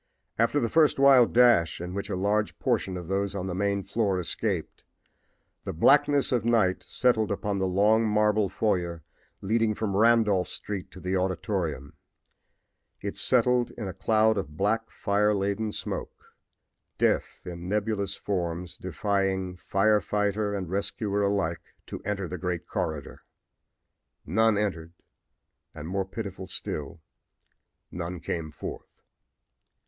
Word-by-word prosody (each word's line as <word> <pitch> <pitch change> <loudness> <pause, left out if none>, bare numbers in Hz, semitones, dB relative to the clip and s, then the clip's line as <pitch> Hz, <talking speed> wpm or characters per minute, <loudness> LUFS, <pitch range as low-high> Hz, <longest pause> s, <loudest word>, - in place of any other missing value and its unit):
After 115 +5 +3
the 115 - +1
first 155 +4 +3
wild 135 -3 +6
dash, 120 -9 +4
in 90 +1 -5
which 100 +1 -4
a - - -1
large 105 +3 0
portion 95 -1 0
of 90 -2 -7
those 100 +1 -1
on 95 -2 -3
the 95 - -3
main 100 +1 0
floor 100 -4 0
escaped, 90 0 -3 0.8
the - - -4
blackness 140 - +4
of 120 -4 +1
night 110 -6 +2
settled 115 -4 +1
upon 100 -1 -2
the 95 - +1
long 105 +4 +3
marble 105 -1 +2
foyer 85 -7 -1 0.4
leading 110 +1 +1
from 100 -3 -2
Randolph 105 -4 +4
street 100 -3 -5
to - - -12
the 90 +1 -2
auditorium. 90 -6 -2 1.1
It 100 - -5
settled 125 -1 +2
in 110 -4 -4
a 95 - -5
cloud 110 +2 +2
of 75 -4 -7
black, 110 +4 0
fire 105 +1 +1
laden 100 +2 -1
smoke - - -6 0.6
death - - 0
in 90 0 -7
nebulous 105 -1 -1
forms 90 -2 -3
defying 95 0 -1
fire 105 +3 +2
fighter 105 0 -1
and 95 -3 -3
rescuer 100 +2 -1
alike 100 -5 -1
to - - -7
enter 100 -2 -3
the 90 +2 -6
great 90 -2 -3
corridor. 80 -8 -4 1.0
None 110 +5 +3
entered, 85 -5 -2 0.8
and, 75 - -7
more 95 +2 -1
pitiful 95 -2 -6
still, 75 -1 -4 0.9
none 85 0 -5
came 80 -1 -4
forth. 75 - -9
100 Hz, 135 wpm, -27 LUFS, 90-110 Hz, 1.1 s, wild